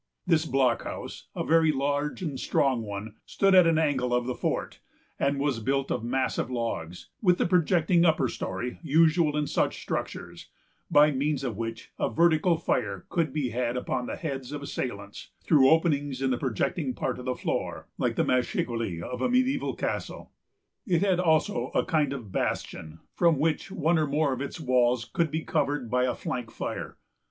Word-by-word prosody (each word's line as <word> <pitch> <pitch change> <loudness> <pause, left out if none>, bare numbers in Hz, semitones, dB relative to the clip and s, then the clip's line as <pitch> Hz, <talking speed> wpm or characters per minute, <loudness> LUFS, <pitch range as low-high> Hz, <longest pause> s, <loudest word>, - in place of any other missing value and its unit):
This 165 -2 +2
blockhouse, 130 -3 -1
a - - -2
very 160 -1 +4
large 145 +4 -1
and 145 -6 -3
strong 130 -4 +1
one, 105 0 -6
stood 195 -1 +2
at 180 -2 +7
an 165 -1 +3
angle 130 -6 +1
of 125 0 0
the 125 - -2
fort, - - -3 0.4
and 140 0 +1
was 140 -4 0
built 135 +4 -1
of - - -1
massive 130 0 -1
logs, 115 -9 -4
with 180 -4 +4
the - - +1
projecting 170 -1 +3
upper 155 -6 +3
story 125 +1 -4
usual 160 0 +3
in 150 - +1
such - - 0
structures, - - -5 0.4
by 150 +1 +6
means 140 +1 -1
of 120 -5 -2
which 115 +1 -6
a - - +1
vertical 170 +1 +3
fire 170 - -2
could 165 -5 0
be 145 -4 -1
had 120 +1 -1
upon 125 0 -2
the - - -4
heads 135 -5 -5
of 145 -1 -5
assailants, 100 -7 -5
through 135 -4 +5
openings 145 -5 +2
in 135 -1 0
the 125 - +1
projecting 130 - -1
part 130 -1 -2
of 125 - -8
the 130 -1 -1
floor, - - -3
like - - 0
the - - +1
machicoulis 115 -7 -1
of 125 - -5
a - - +1
mediæval 255 +3 +1
castle. - - -4 0.6
It 175 -3 +2
had 190 -3 +2
also 170 +3 +2
a - - +2
kind 150 -4 +1
of 120 -8 -6
bastion, 80 -3 -3
from 170 -3 +3
which 155 +6 0
one 170 -4 +1
or 155 - +1
more 145 0 +1
of 130 - -5
its 140 +4 -5
walls 125 -4 +2
could 165 +7 0
be 160 +2 -3
covered 145 -5 -1
by 125 0 +2
a 125 - -1
flank 120 -3 -4
fire. - - -5
140 Hz, 180 wpm, -27 LUFS, 125-160 Hz, 0.6 s, at